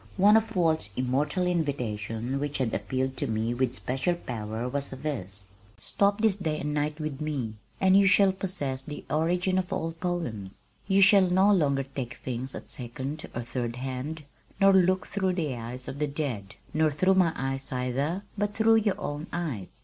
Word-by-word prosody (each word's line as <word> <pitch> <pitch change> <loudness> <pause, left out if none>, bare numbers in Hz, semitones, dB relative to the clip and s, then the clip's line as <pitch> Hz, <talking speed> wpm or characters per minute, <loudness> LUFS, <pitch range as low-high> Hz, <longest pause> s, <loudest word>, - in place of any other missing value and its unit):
One 205 +3 +6
of 225 0 +2
Walt's 160 - +2
immortal 140 +8 +1
invitations 125 -7 -1
which 145 0 -2
had 125 -4 -1
appealed 130 +5 -2
to - - -1
me 110 +1 0
with 125 0 0
special 135 +8 -1
power 115 -6 -4
was 140 +2 -1
this: 120 -9 -5 0.3
Stop 200 - +1
this 220 -3 +3
day 160 -5 -2
and 150 +1 -2
night 150 +1 -1
with 155 -2 -4
me 140 -8 -2 0.3
And 190 0 +5
you 200 0 +6
shall 195 0 +6
possess 180 -9 -3
the 150 +2 -8
origin 180 +5 +2
of 180 - -4
all 165 +1 -1
poems; 165 - -4 0.2
You 195 0 +4
shall 190 -1 +6
no 190 +3 +5
longer 140 -7 +2
take 130 -2 -6
things 130 +1 -5
at - - -8
second 130 +5 -5
or 120 - -2
third 120 0 -3
hand 135 +5 -4 0.4
Nor 195 0 +6
look 185 0 +4
through 190 -2 0
the 155 -7 -1
eyes 120 +2 -7
of 140 - -6
the 150 - +1
dead, 135 -9 -3 0.2
Nor 155 0 +3
through 185 +6 +3
my 185 -3 +4
eyes 135 0 -3
either, 135 +9 -1
But 205 0 -1
through 225 +1 +5
your 210 -3 +1
own 145 +2 -4
eyes.... 145 - -4
145 Hz, 180 wpm, -28 LUFS, 125-180 Hz, 0.4 s, One